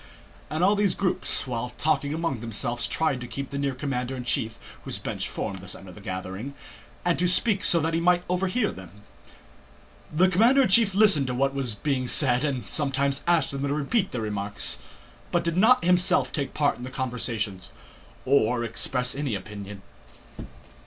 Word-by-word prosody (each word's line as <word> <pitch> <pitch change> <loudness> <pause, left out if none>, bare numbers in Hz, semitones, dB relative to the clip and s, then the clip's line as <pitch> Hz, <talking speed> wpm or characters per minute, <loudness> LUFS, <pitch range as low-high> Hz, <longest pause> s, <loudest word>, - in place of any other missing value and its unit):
And 155 +3 -1
all 200 +3 +5
these 205 -2 +2
groups, 185 -5 0
while 125 -1 -3
talking 145 -2 +1
among 160 -5 -2
themselves, 115 +1 -2
tried 150 -6 0
to 120 - -6
keep 135 +3 -6
near 140 -1 -1
the - - -13
commander 130 -2 -3
in 125 - -5
chief 115 -2 -1 0.3
(whose - - -4
bench - - -4
formed 95 - -4
the 95 - -11
center 95 +1 -6
of - - -11
the 105 - -13
gathering) 95 +8 -6 0.5
and 175 -1 +2
to 180 - +2
speak 200 +2 +1
so 165 +1 +4
that 165 +2 -1
he 165 - +1
might 175 +1 +3
overhear 190 +5 0
them. 95 +2 -13 1.1
The 175 +5 +4
commander 230 +9 +4
in 250 - +1
chief 200 -1 +4
listened 195 -10 +5
to 125 - -2
what 135 +2 +1
was 130 -6 -1
being 130 +2 -1
said 125 -1 +3
and 130 -8 -2
sometimes 140 -1 0
asked 170 -2 +3
them 140 0 -4
to 140 0 -1
repeat 190 +8 0
their 120 - -3
remarks, 100 - 0 0.5
but 175 - +1
did 170 -1 -1
not 220 +1 +5
himself 180 +1 +3
take 140 -4 -3
part 145 -1 +1
in 125 - -9
the 130 - -5
conversations 115 -8 -3 0.5
or 125 -3 +2
express 125 +2 0
any 140 -5 -2
opinion. 100 0 -8
140 Hz, 185 wpm, -26 LUFS, 120-175 Hz, 1.1 s, all